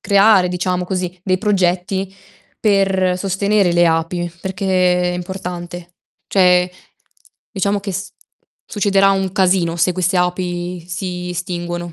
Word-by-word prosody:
creare, 200 -2 +4
diciamo 180 0 -1
così, 180 -1 -3
dei 185 -1 0
progetti 190 -1 0 0.5
per 195 -3 +2
sostenere 195 0 +1
le 175 0 +4
api 165 +2 -1
perché 185 -2 +1
è - - -4
importante. 175 -1 -6 0.3
Cioè 180 -2 +4 0.8
diciamo 200 0 0
che 195 -1 -5
s 195 +3 -5 0.6
succederà 195 -1 +2
un 195 -1 0
casino 185 -3 +2
se 180 +2 +2
queste 185 +1 0
api 180 -1 -2
si 180 -1 -4
estinguono. 175 -1 -4
180 Hz, 120 wpm, -18 LUFS, 175-195 Hz, 0.8 s, creare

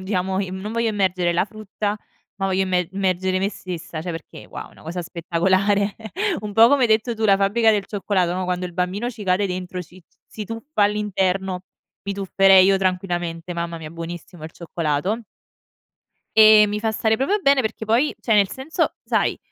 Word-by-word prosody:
diciamo 190 0 -1
in 185 -1 -4
mhmm, 190 - -6
non 210 +2 -5
voglio 230 0 0
immergere 185 -4 +1
la 170 - +2
frutta 210 0 -4 0.4
ma 195 - -1
voglio 190 0 +1
immer 180 -2 0
immergere 185 -1 0
me 195 +1 0
stessa, 170 -5 -7
cioè 175 - -4
perché, 165 -1 -9
wow, - - -8
è - - -20
una - - -18
cosa 170 +3 -5
spettacolare. 190 +4 +1 0.5
Un 210 -1 -6
po' 225 +3 +7
come 280 -1 +3
hai 240 - +4
detto 220 +2 +2
tu, 220 0 -3
la 195 -2 +5
fabbrica 220 +3 +3
del 205 -2 +1
cioccolato 195 -4 0
no, 185 0 -2
quando 180 0 -2
il 180 - -10
bambino 185 +6 -2
ci 225 -3 -8
cade 190 +2 +2
dentro, 180 0 -5
ci 180 +2 -17 0.2
si 215 - -7
tuffa 225 +3 -3
all'interno, 190 -3 0 0.4
mi 200 - -3
tufferei 195 -1 +5
io 195 0 +4
tranquillamente. 180 -3 -2
Mamma 170 0 -4
mia, 155 -1 -8
buonissimo 170 0 -8
il 155 - -7
cioccolato. 170 +4 -2 1.2
Ehm, 215 -1 +8
mi 210 +1 -3
fa 220 - 0
stare 220 0 +1
proprio 280 - +1
bene 275 -5 +4
perché 220 -1 -3
poi 235 +7 +2
cioè 225 - +1
nel 200 -2 +4
senso, 265 +5 -2
sai - - 0
195 Hz, 195 wpm, -22 LUFS, 180-215 Hz, 1.2 s, Ehm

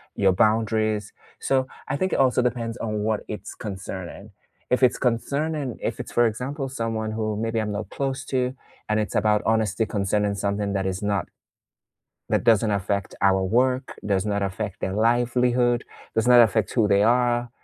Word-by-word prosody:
your 95 -1 +3
boundaries, 110 +1 +1 0.3
so, 130 -1 +1 0.2
I 135 - 0
think 185 +4 -1
it - - +1
also 130 -2 +4
depends 120 -1 -2
on 110 -3 -3
what 110 -1 0
it's 105 - -7
concerning. 95 0 -7 0.4
If 125 - +2
it's 125 - +4
concerning 140 +3 -1
if - - -3
it's, - - -6
for 120 - +4
example, 135 +5 -4
someone 115 -4 -3
who, 110 -1 -2
maybe 115 0 -1
I'm 105 -1 -3
not 100 -1 -4
close 135 -1 -3
to, 125 -1 -1 0.4
and 110 0 +2
it's 105 - -3
about 105 0 +3
honesty 110 0 +1
concerning 105 0 0
something 100 0 -1
that 95 -1 -1
is 95 +1 -2
not 100 -1 -1 1.0
that - - +1
doesn't 115 -2 +4
affect 100 0 -1
our 95 -1 +3
work, 125 +6 0
does 100 -2 +1
not 100 -1 -1
affect 100 0 -3
their 95 - -2
livelihood, 120 +2 +2 0.3
does 110 +1 +1
not 125 -1 +8
affect 110 -3 +3
who 115 -4 +3
they 100 0 +4
are 120 +1 +2
110 Hz, 175 wpm, -24 LUFS, 100-120 Hz, 1.0 s, not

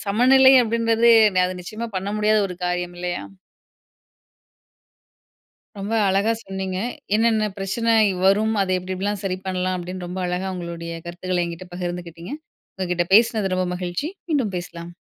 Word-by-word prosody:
சமநிலை 260 +5 +6
அப்படின்றது, 230 0 +2 0.2
நெ 185 - +4
அது 185 0 -5
நிச்சயமா 220 +5 -5
பண்ண 190 +2 -3
முடியாத 215 0 +3
ஒரு 180 - -6
காரியம் 180 0 -2
இல்லையா? 175 - -3 2.6
ரொம்ப 205 +3 -3
அழகா 200 +4 +2
சொன்னீங்க. 190 -1 -4 0.4
என்னன்ன 220 -1 +3
பிரச்சனை 230 +4 0 0.2
இ - - -1
வரும். 210 +3 +3
அதை 185 -1 -1
எப்படி 185 +1 -6
எப்படி 190 +2 -5
எல்லாம் 205 -1 -2
சரி 185 -1 -1
பண்ணலாம் 185 0 -1
அப்படின்னு 180 0 -6
ரொம்ப 185 +1 -5
அழகா 185 +2 -2
உங்களுடைய 170 -1 -6
கருத்துக்களை 175 +1 -2
என்கிட்ட 170 +2 -7
பகிர்ந்துகிட்டிங்க. 175 - -6 0.4
உங்ககிட்ட 180 -2 -1
பேசினது 215 -3 +4
ரொம்ப 185 0 0
மகிழ்ச்சி. 180 - -3 0.2
மீண்டும் 245 -11 0
பேசலாம். 170 0 -9
185 Hz, 145 wpm, -22 LUFS, 180-215 Hz, 2.6 s, சமநிலை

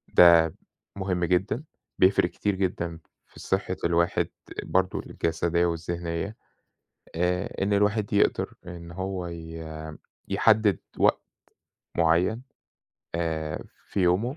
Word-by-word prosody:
ده 85 -2 +7 0.4
مهم 90 -3 0
جدًا، 95 - +1 0.4
بيفرق 95 -1 +5
كتير 100 +2 -1
جدًا 85 -3 -2 0.3
في - - -16
صحة - - -1
الواحد 85 +1 +2 0.4
برضه 95 0 +1
الجسدية 85 +1 0
والذهنية. 85 +3 -3 0.8
آآ، 90 +3 0
إن 100 - +1
الواحد 105 +1 +2
يقدر 100 - +2
إن 85 -1 -8
هو 95 0 -3
ي 80 -1 -7 0.7
يحدد 110 -2 +4 0.2
وقت - - +3 0.8
معين 85 +8 +3 0.7
آآ 80 -2 -2 0.2
في 100 - -2
يومه 95 - +2
90 Hz, 105 wpm, -27 LUFS, 85-100 Hz, 0.8 s, ده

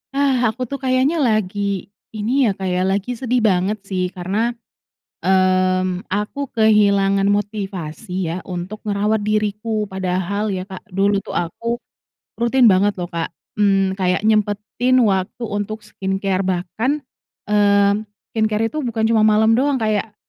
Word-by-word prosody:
Ah, 280 -2 +3 0.2
aku 255 - -11
tuh 280 - -3
kayaknya 260 +5 +2
lagi, 210 -3 0 0.6
ini 250 +6 +2
ya, 210 - +2
Kak, 190 -1 -4
ya, 180 - +1
lagi 200 +4 -1
sedih 250 0 0
banget 190 +3 +1
sih 185 -1 -1
karena, 200 +7 -1 0.7
mmm, 185 -1 +2
aku 210 +7 -3 0.2
kehilangan 200 -3 +4
motivasi 200 -3 -5 0.2
ya 165 - -2 0.2
untuk 180 +4 -5
ngerawat 210 +1 +1
diriku. 215 0 -1
Padahal 190 +2 -1
ya, 185 - -2
Kak, 190 -1 -9
dulu 200 +1 +3
tuh - - -7
aku 235 +8 -4 0.6
rutin 235 +2 +3
banget 200 +2 +3
loh, 175 -1 -4
Kak, 165 -1 -2 0.3
mmm, 195 -2 +3
kayak 180 +1 +1
nyempetin 215 +3 +1
waktu 195 +3 0
untuk 210 0 -4
skincare. 195 0 -2
Bahkan, 185 +8 -1 0.6
mmm, 200 -1 +4 0.4
skincare 220 -1 +1
itu 310 - -3
bukan 225 -1 -2
cuma 225 - +3
malam 215 +1 +4
doang, 285 +1 +2
kayak 215 -3 -1
205 Hz, 140 wpm, -20 LUFS, 190-220 Hz, 0.7 s, kehilangan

